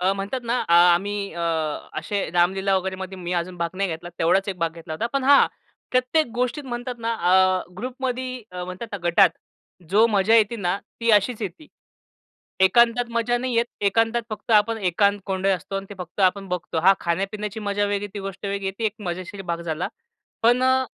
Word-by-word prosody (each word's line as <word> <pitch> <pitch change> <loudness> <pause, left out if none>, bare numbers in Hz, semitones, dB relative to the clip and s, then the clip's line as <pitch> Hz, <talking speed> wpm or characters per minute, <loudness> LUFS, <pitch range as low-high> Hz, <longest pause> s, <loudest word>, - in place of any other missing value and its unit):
अ, 185 +2 +2
म्हणतात 200 +6 -3
ना 235 - 0
आ 170 - +6 0.2
आम्ही 200 +1 -3
अ, 170 - -5 0.6
असे 200 -1 -2
रामलीला 190 +3 +2
वगैरेमध्ये 190 0 -4
मी 175 0 -4
अजून 180 +1 -2
भाग 170 -1 -2
नाही 195 0 0
घेतला. 165 +1 -6
तेवढाच 185 +4 +2
एक 195 - -3
भाग 165 -1 0
घेतला 165 -1 -9
होता. 190 +9 -2
पण 275 -1 0
हां, 280 +1 +7 0.4
प्रत्येक 255 +5 +2
गोष्टीत 250 +4 -1
म्हणतात 245 +1 -4
ना, 230 0 -1
अ, 185 -1 +3 0.2
ग्रुपमध्ये 255 +1 -4
अ, 180 0 -5
म्हणतात 185 +5 -6
ना, - - -2
गटात 170 - +6 0.6
जो 215 +4 +5
मजा 210 0 +3
येते 225 +1 +3
ना 185 -2 -1 0.2
ती 230 - +2
अशीच 215 +2 +3
येती. 200 - -6 0.9
एकांतात 235 +5 +5
मजा 235 +1 0
नाही 250 0 -2
येत. 235 +1 +3
एकांतात 225 +4 +2
फक्त 215 +2 -7
आपण 225 +2 +2
एकांत 200 +3 +2
कोंडलेलं 190 0 +1
असतो 195 +3 -6
आणि 195 0 -5
ते - - -7
फक्त 180 +2 -7
आपण 195 +1 +2
बघतो. 180 -2 -3
हां, 190 +4 +6
खाण्यापिण्याची 195 +5 -2
मजा 205 0 0
वेगळी 205 0 -1
आहे, 200 - -18
ती - - -4
गोष्ट 195 0 -8
वेगळी 200 0 -3
आहे. 190 - -1
ती 225 - -2
एक 210 - -2
मजेशीर 185 +3 -5
भाग 170 - -3
झाला. 165 0 -3 0.5
पण 240 +2 +4
अ, 260 0 +3
200 Hz, 195 wpm, -23 LUFS, 185-230 Hz, 0.9 s, हां